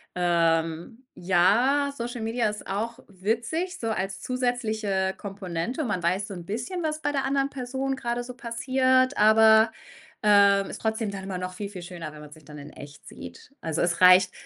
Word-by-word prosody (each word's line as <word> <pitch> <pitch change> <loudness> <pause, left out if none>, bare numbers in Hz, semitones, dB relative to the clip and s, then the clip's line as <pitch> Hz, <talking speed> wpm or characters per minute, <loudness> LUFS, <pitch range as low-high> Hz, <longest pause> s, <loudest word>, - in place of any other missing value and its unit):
ähm 170 +5 0
ja, 230 +11 +2
Social 240 0 -5
Media 225 +1 0
ist 210 0 -8
auch 225 +5 -3
witzig 235 - -2
so 225 - -2
als 195 -2 -3
zusätzliche 220 -6 -1
Komponente. 195 - -4
Man 195 -8 -2
weiß 185 +4 0
so 200 - -7
‘n 175 - -9
bisschen, 245 - -4
was 310 0 -2
bei 290 - 0
der 275 -2 -1
anderen 275 0 0
Person 265 0 -3
grade 240 -1 -3
so 250 +1 -8
passiert, 255 +2 +1
aber, 220 +1 +6 0.5
ähm, 200 -1 +5
ist - - -7
trotzdem 220 -1 -1
dann 195 -1 -7
immer 190 -1 -4
noch 185 0 -5
viel, 200 +1 -6
viel 185 -3 -9
schöner, 170 -4 -8
wenn 150 - -11
man 150 -1 -12
sich 155 -1 -16
dann 150 +1 -11
in 145 0 -10
echt 145 0 -13
sieht. 85 - -11
Also, 160 -1 -2
es 170 0 0
reicht 185 0 +7
210 Hz, 185 wpm, -26 LUFS, 180-245 Hz, 0.5 s, reicht